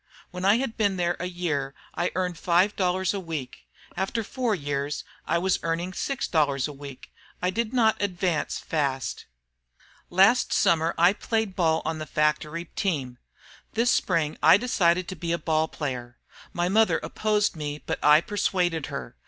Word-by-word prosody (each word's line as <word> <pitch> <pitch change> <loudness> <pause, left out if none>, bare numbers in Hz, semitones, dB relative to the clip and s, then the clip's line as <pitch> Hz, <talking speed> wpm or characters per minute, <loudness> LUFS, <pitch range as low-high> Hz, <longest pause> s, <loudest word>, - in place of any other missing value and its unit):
When 180 +1 -4
I 205 +3 +5
had 250 -3 -3
been 200 -4 +1
there 175 -1 0
a 180 - -2
year 150 -7 -2 0.2
I 175 - 0
earned 180 -2 -2
five 180 +4 +2
dollars 185 0 +1
a 200 - -2
week. 150 - -6 0.3
After 220 +4 -1
four 240 0 -1
years 145 -2 -3 0.2
I - - +2
was 185 +2 +1
earning 170 +2 -2
six 270 +7 -2
dollars. 145 -4 +1 0.7
I 180 - 0
did 230 +2 -1
not 225 -5 +2
advance 180 -5 -1
fast." 140 -4 -2 0.8
"Last 195 +7 +4
Summer 165 0 +2
I 175 +3 +5
played 220 -2 -2
ball 160 -3 +2
on 160 0 -2
the 155 - -5
factory 150 +2 0
team. 140 - -2 0.5
This 235 +2 +2
Spring 165 -5 0
I 160 +4 +7
decided 185 -8 +1
to 185 - -5
be 170 -2 -2
a - - +1
ball 155 0 +1
player. 125 -6 -5 0.3
My 175 0 0
mother 220 +4 +3
opposed 210 -2 0
me, 150 -1 -5
but - - -3
I 150 +1 +7
persuaded 175 -6 0
her. 65 -2 -6
175 Hz, 160 wpm, -26 LUFS, 155-195 Hz, 0.8 s, I